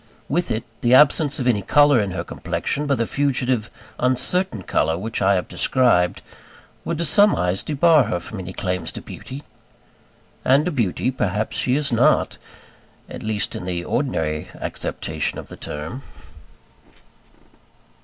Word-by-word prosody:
With 175 +4 -1
it, 110 +1 -1 0.2
the 120 +1 +5
absence 150 +1 +4
of 125 - -2
any 115 -5 +2
colour 145 +2 +4
in 100 - -2
her 90 - -4
complexion 150 +1 -3
but 140 -2 +1
the 115 - 0
fugitive 130 -4 0 0.3
uncertain 130 - 0
colour 80 -1 0
which 110 +4 -4
I 100 +1 +4
have 90 - -1
described, 105 -9 +2 0.6
would 170 - -3
to 170 - -1
some 205 +7 +5
eyes 90 +2 +1
debar 155 -1 +4
her 95 -5 -2
from 100 +4 -8
any 95 0 -6
claims 90 -2 -3
to - - -7
beauty. 140 +3 -9 1.0
And 140 +5 +3
a - - 0
beauty 120 - 0
perhaps 105 -4 -2
she 125 - +1
is 145 -2 -1
not 115 - +2 0.7
at - - -8
least, 110 -1 -2
in 90 - -6
the 90 -1 -3
ordinary 80 - -1
acceptation - - -4
of - - -8
the - - -9
term. 80 - -6
120 Hz, 155 wpm, -22 LUFS, 95-145 Hz, 1.0 s, the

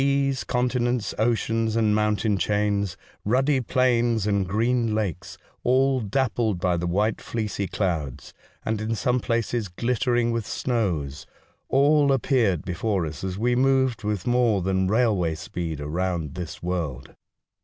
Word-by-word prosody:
Seas, 140 -1 +1
con 125 0 0
tinents, 120 -2 -1
oceans, 115 -1 +1
and 110 -2 +3
mountain 105 0 +1
chains, 100 -2 0 0.3
ruddy 130 +5 +2
plains 120 -3 +2
and 100 -3 +1
green 115 +2 +1
lakes, 100 -2 -3 0.3
all 130 +1 +3
dappled 110 -3 0
by 90 -1 +1
the 85 +1 -2
white 105 +5 0
fleecy 105 -3 -3
clouds, 80 - -3 0.3
and, 110 -1 -1
in 110 +1 -1
some 125 +3 +1
places, 115 -1 -1
glittering 120 +4 0
with 115 -2 -2
snows 85 - -2 0.2
— - - -39
all 145 +1 +4
appeared 120 - +1
before 90 +1 -1
us 75 0 -7
as 95 -1 -3
we 120 +3 +1
moved 130 -3 +2
with 105 -3 -2
more 120 -6 +2
than 95 0 +1
railway 100 -7 +2
speed 80 -1 -5
around 80 0 -2
this 90 -2 -7
world. 80 -8 -3
110 Hz, 145 wpm, -25 LUFS, 95-120 Hz, 0.3 s, all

